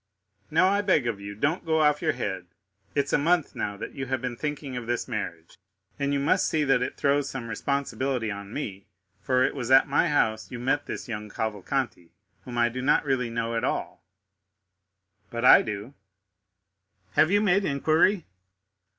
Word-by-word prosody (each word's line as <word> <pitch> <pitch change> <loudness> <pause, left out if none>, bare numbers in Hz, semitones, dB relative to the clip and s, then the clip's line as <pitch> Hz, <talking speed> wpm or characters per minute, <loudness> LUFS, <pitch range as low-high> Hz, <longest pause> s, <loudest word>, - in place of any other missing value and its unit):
"Now, 165 +4 +4
I 200 +1 +2
beg 185 -10 +2
of 115 -4 -2
you, 100 0 -7
don't 145 - 0
go 160 -1 +1
off 150 -1 +3
your - - +1
head. 95 -7 -4 0.5
It's 140 -1 0
a - - +4
month 165 +1 +1
now 100 -1 -3
that - - -6
you 135 0 -5
have 130 0 -1
been 125 -1 -4
thinking 145 -1 -4
of 120 -2 -5
this 120 0 -1
marriage, 95 -8 -6 0.4
and 140 0 0
you 140 - +1
must 140 - +2
see 155 -1 +1
that 135 -3 +3
it 125 - -3
throws 140 0 +1
some 125 -3 -6
responsibility 130 0 -2
on 100 0 -7
me, 100 -8 -6 0.3
for 130 +5 +2
it - - +1
was 125 -4 -4
at 135 +3 +6
my 145 +5 +2
house 110 -8 +1
you 125 - -6
met 135 +4 -1
this - - -5
young 105 -3 -5
Cavalcanti, 110 -2 -3 0.4
whom 120 -1 -6
I 120 0 +4
do 125 +2 -4
not 145 +3 +3
really 130 -4 0
know 115 0 -2
at 115 - -1
all." - - -3 1.3
"But 115 +1 -3
I - - +9
do." 105 +4 -5 1.2
"Have 155 - +4
you 205 +2 +4
made 200 -1 +3
inquiry?" 160 +4 +2
130 Hz, 185 wpm, -26 LUFS, 115-145 Hz, 1.3 s, I